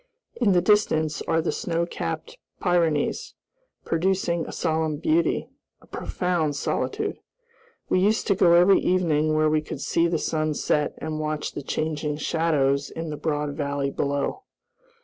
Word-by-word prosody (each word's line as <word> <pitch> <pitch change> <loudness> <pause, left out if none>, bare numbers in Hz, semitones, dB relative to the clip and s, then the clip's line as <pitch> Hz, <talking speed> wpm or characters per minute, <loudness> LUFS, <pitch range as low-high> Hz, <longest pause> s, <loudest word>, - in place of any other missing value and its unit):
In 215 -6 +2
the 175 -1 +3
distance 160 -7 +2
are 165 0 +2
the - - 0
snow 170 -5 -1
capped 470 - -5 0.2
Pyrenees, 170 -5 0 0.5
producing 170 -1 0
a - - -6
solemn 160 -2 -1
beauty, 315 - +1 0.3
a - - -20
profound 170 -5 -2
solitude. - - -2 0.7
We - - +2
used 210 +4 +2
to 200 - +3
go 175 -2 +5
every 180 +3 +6
evening 155 -4 +1
where 155 0 +3
we 155 0 +2
could 150 - -7
see 165 +4 +1
the 170 -1 0
sun 155 -1 -1
set 150 0 0
and 155 -1 -4
watch 155 -1 -2
the - - -6
changing 150 +1 -2
shadows 145 -3 +1
in 165 -1 -5
the - - -3
broad 150 -1 -2
valley 140 -2 -2
below. 140 - -2
160 Hz, 150 wpm, -25 LUFS, 150-175 Hz, 0.7 s, every